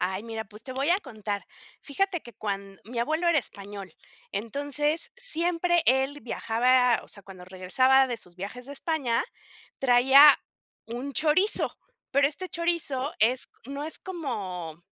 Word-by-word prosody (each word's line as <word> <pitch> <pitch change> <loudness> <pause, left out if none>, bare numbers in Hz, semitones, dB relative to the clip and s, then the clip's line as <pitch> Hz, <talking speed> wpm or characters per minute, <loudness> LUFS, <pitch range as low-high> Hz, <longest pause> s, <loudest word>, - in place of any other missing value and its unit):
Ay, 190 +2 -1
mira, 225 -1 -5
pues 210 +2 -13
te 260 - -7
voy 275 +5 0
a 380 - +3
contar. 215 - -5 0.4
Fíjate 360 +4 -1
que 240 - -12
cuan 195 -1 -5
mi 235 +2 -4
abuelo 315 +8 0
era 325 -3 +4
español, 200 -5 -9 0.4
entonces 290 - -1
siempre 345 -7 +1
él 265 +3 +3
viajaba 245 +2 +2
o - - -16
sea, 200 - -9
cuando 185 -2 -12
regresaba 255 +9 +3
de 240 - -3
sus 180 -6 -13
viajes 205 +7 -7
de 285 - -7
España, 275 -6 0 0.6
traía 270 +3 +7 0.5
un 245 +5 -5
chorizo. 320 - +2 0.4
Pero 280 +1 +4
este 370 +5 -5
chorizo 320 -6 -1
es 245 +4 +2 0.2
no 280 +2 -5
es 315 - -3
como 195 - -5
260 Hz, 150 wpm, -27 LUFS, 215-300 Hz, 0.6 s, traía